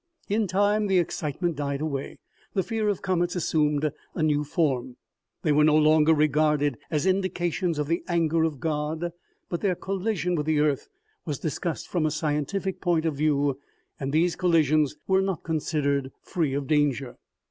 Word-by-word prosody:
In 210 +1 +1
time, 205 +3 +2
the 190 -1 +3
excitement 170 0 -1
died 140 -1 -2
away. 140 -3 -4 0.4
The 190 - +2
fear 220 -1 -1
of 205 - -2
comets 180 -2 0
assumed 150 -3 +1 0.2
a 160 - -1
new 150 -1 +2
form. 130 -5 -1 0.5
They 155 - +2
were 150 +1 +4
no 155 0 +5
longer 155 0 +5
regarded 150 -2 +2
as 155 0 0
indications 185 -3 0
of 150 - 0
the 165 +3 0
anger 165 -2 +1
of 155 -4 -1
God, 155 +3 -2 0.4
but 170 - -3
their 195 -3 +1
collision 190 -1 -2
with 150 -3 -1
the 155 -1 +2
earth 150 - +1 0.3
was 150 -4 -3
discussed 160 +3 -3
from 165 -4 0
a - - +1
scientific 155 +6 -2
point 170 -3 +1
of 160 - +1
view, 140 -2 +1 0.4
and 135 -1 -3
these 165 +3 +2
collisions 155 -5 +2
were 190 0 +4
not 190 -4 -2
considered 145 -4 -1
free 160 -7 -1
of 140 -1 -2
danger. 140 -3 0
155 Hz, 170 wpm, -26 LUFS, 150-175 Hz, 0.5 s, no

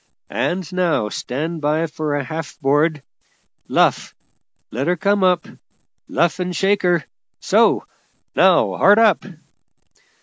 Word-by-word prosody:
And 180 +1 -1
now 165 -12 0
stand 155 +9 -4
by 155 +2 +1
for 150 -2 -3
a 145 - -2
half 160 +3 -7
board! 145 +2 +1 0.6
Luff! - - +1 0.6
let 130 +5 -3
her 180 - +2
come 200 +2 +1
up! 180 -2 +2 0.6
luff 170 +1 0
and 180 -1 -3
shake 200 +3 +1
her! 175 -4 +1 0.3
so! - - +2 0.5
Now - - +3
hard 205 +2 +5
up!" 225 -3 +4
165 Hz, 125 wpm, -19 LUFS, 150-185 Hz, 0.6 s, hard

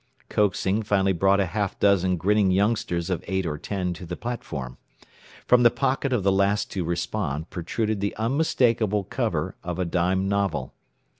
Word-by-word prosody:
Coaxing 100 0 +1
finally 100 -2 +2
brought 95 +3 +3
a 100 - +3
half 100 +2 -2
dozen 95 -2 +3
grinning 100 +2 +2
youngsters 95 -3 0
of 90 - -2
eight 95 0 -1
or 75 -3 -3
ten 90 -1 -2
to 90 - -10
the 90 - -4
platform. 70 - -5 0.7
From 125 0 +5
the 120 - +7
pocket 135 +2 -1
of 120 -6 +1
the 100 - +3
last 100 +2 +1
to 95 - -2
respond 85 -2 -3
protruded 105 +5 -2
the 100 - -2
unmistakable 115 -4 +1
cover - - -2
of 90 0 -4
a 90 - 0
dime 90 +2 0
novel. 95 -9 -1
95 Hz, 165 wpm, -25 LUFS, 90-105 Hz, 0.7 s, the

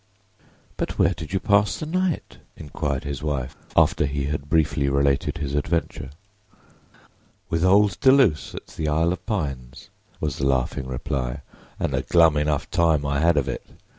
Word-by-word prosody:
"But - - -3
where 85 - +3
did 80 -1 -8
you 95 - 0
pass 100 +2 +2
the - - -5
night?" 180 +1 -2 0.2
inquired 70 -2 -3
his 70 -2 -5
wife, 70 -4 -3 0.2
after - - +4
he 70 0 -2
had 70 0 -4
briefly 75 -3 +2
related 70 +2 +1
his 70 -3 -4
adventure. 75 -2 -2 1.4
"With 85 0 0
old 100 0 +4
Deluse 130 - +3
at - - -8
the 80 - -5
'Isle 80 +3 +2
of - - -8
Pines,'" 70 - -4 0.3
was 75 -3 -2
the 70 - +1
laughing 65 0 -1
reply; 65 -1 -3 0.4
"and - - -1
a - - +1
glum 85 -3 +4
enough 75 -1 0
time 80 -5 +2
I 70 0 0
had 85 +1 +3
of 70 - +1
it. - - -4
75 Hz, 165 wpm, -23 LUFS, 70-85 Hz, 1.4 s, after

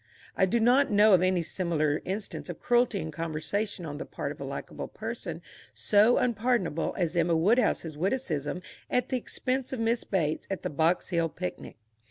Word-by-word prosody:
I 190 - +3
do 235 +5 +1
not 250 +5 +4
know 210 0 +6
of 180 - +6
any 185 -2 +2
similar 155 -4 0
instance 195 0 -4
of 175 - -6
cruelty 240 -3 +2
in 160 -4 -4
conversation 165 +5 -3
on 145 -1 -6
the - - -5
part - - -4
of - - -10
a - - -3
likeable - - -6
person - - -6 0.3
so 215 +3 +4
unpardonable 225 -8 0
as 175 -2 0
Emma 170 0 +3
Woodhouse's 190 -4 +2
witticism 180 - -2 0.3
at 250 - 0
the 260 - +1
expense 255 +1 -3
of 260 - -3
Miss 230 +1 +1
Bates 160 -6 -1
at 195 - -4
the - - -2
Box 160 +4 +1
Hill 170 -2 +1
picnic. 90 - -6
185 Hz, 180 wpm, -28 LUFS, 165-230 Hz, 0.3 s, know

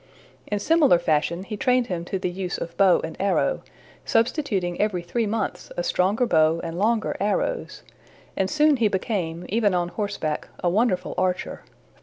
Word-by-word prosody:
In 210 - -1
similar 290 - +4
fashion 170 +1 0
he 210 +2 -6
trained 250 +3 +2
him 175 -5 -4
to 190 - -2
the 180 -1 -2
use 180 0 -4
of 170 0 -6
bow 190 -1 +4
and 160 - -5
arrow, 200 - +1 0.4
substituting 225 - 0
every 200 -5 0
three 220 +6 -1
months 205 -4 -3
a 175 - 0
stronger 195 +8 +1
bow 160 -4 +3
and 165 +1 -5
longer 220 +2 +1
arrows; 210 - -2 0.5
and 190 0 0
soon 300 -1 +3
he 230 -3 +3
became, 180 -4 -2
even 205 -2 +1
on 175 -1 0
horseback, 190 -7 -3 0.2
a 175 - +3
wonderful 190 -3 +1
archer. 185 -1 -1
195 Hz, 165 wpm, -24 LUFS, 175-225 Hz, 0.5 s, similar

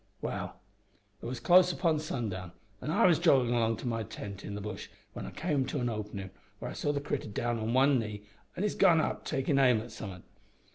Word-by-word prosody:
"Well, - - -4 0.6
it - - -5
was 125 +1 -4
close 180 0 +6
upon 165 -3 +1
sundown, 105 - -4 0.3
an' - - -4
I 160 - +4
was 175 -4 +5
joggin' 135 -8 +4
along 115 -2 +2
to 125 - -5
my 115 -1 -1
tent 100 -2 -7
in 100 - -5
the - - -4
bush 105 +1 -6 0.2
when - - -6
I - - -4
came 150 -3 0
to 145 - -2
an 120 -1 0
openin' 105 -3 -5 0.3
where - - -5
I - - -6
saw 145 - -1
the 145 - -1
critter 145 -4 -3
down 120 +3 -1
on 110 +2 -1
one 135 0 +5
knee 105 -2 -5 0.3
an' 185 - -1
his 210 - +1
gun 175 -5 +5
up - - -1
takin' 135 +1 +1
aim 125 -4 +5
at 115 +2 -8
somethin'. 95 -5 -8
120 Hz, 225 wpm, -31 LUFS, 110-150 Hz, 0.6 s, close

